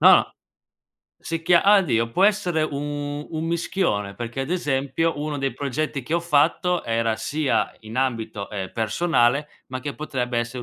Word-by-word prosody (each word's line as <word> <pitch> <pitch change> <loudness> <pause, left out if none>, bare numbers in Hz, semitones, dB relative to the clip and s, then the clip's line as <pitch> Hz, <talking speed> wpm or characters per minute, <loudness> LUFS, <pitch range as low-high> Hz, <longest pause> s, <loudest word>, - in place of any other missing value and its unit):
No, - - +6 0.8
si 165 0 -4
chia 175 0 +5
ah 205 0 +7
dio, 115 -7 +1
può 185 +10 +3
essere 190 -6 +2
u 150 -2 -2
un 145 +2 -4
mischione, 165 - -1
perché, 120 +4 -5
ad 135 +3 -4
esempio, 150 -1 0
uno 150 -1 -3
dei 135 -1 -1
progetti 140 0 -2
che 155 +7 -2
ho 170 - +2
fatto 170 +3 +2
era 115 -1 0
sia 150 +1 0
in 110 +2 -9
ambito, 115 -6 -2
ehm, 95 -3 -5
personale, 125 +3 +2 0.2
ma 130 0 -4
che 145 +1 -5
potrebbe 125 -3 -2
essere 120 +1 -3
145 Hz, 165 wpm, -23 LUFS, 120-165 Hz, 0.8 s, ah